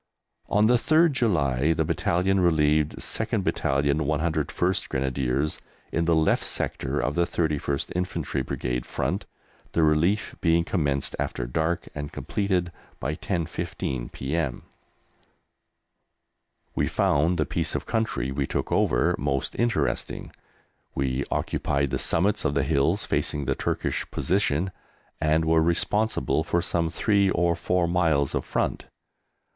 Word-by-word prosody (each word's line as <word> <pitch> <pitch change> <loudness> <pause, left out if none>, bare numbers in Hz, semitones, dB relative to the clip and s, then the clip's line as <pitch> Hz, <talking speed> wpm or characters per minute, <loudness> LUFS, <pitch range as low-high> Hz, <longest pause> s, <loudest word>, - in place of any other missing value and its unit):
On 105 +1 +4
the 120 +2 +5
3rd 160 +6 +4
July 80 - +2
the - - 0
Battalion 95 +3 +1
relieved 75 -3 +3
2/101 75 +5 0
Grenadiers 65 +2 -1 0.3
in 85 - 0
the 85 0 +3
left 80 0 +2
sector - - -2
of 70 - 0
the 85 +1 +1
31st 75 -5 -1
Infantry 90 -6 -2
Brigade 60 -1 -3
front, - - -2 0.5
the 85 - +3
relief 80 +7 +2
being 85 -1 +3
commenced 70 -6 -1
after - - -2
dark 80 +7 -1
and 75 0 -5
completed 95 -4 -1 0.3
by 75 +4 -2
10.15 85 -7 -3
p.m. 65 -2 -2 2.1
We - - +1
found 80 +5 +2
the - - +1
piece - - -2
of - - -2
country 110 - -1
we 70 0 -1
took - - -2
over - - +3
most 70 -1 -1
interesting. 120 0 -1 0.6
We 65 0 -1
occupied 70 -1 -1
the 65 - -1
summits 100 +5 +1
of 70 - 0
the - - +2
hills 70 0 +1
facing 75 -1 -1
the 70 - +1
Turkish - - -2
position, 95 -1 0 0.5
and 80 +1 +2
were 80 0 +4
responsible 85 +1 +1
for 85 +1 +1
some 85 -1 0
three 100 +3 +2
or 85 -2 +2
four 90 -1 +1
miles 80 -5 +2
of - - -1
front. - - -2
80 Hz, 130 wpm, -26 LUFS, 70-90 Hz, 2.1 s, the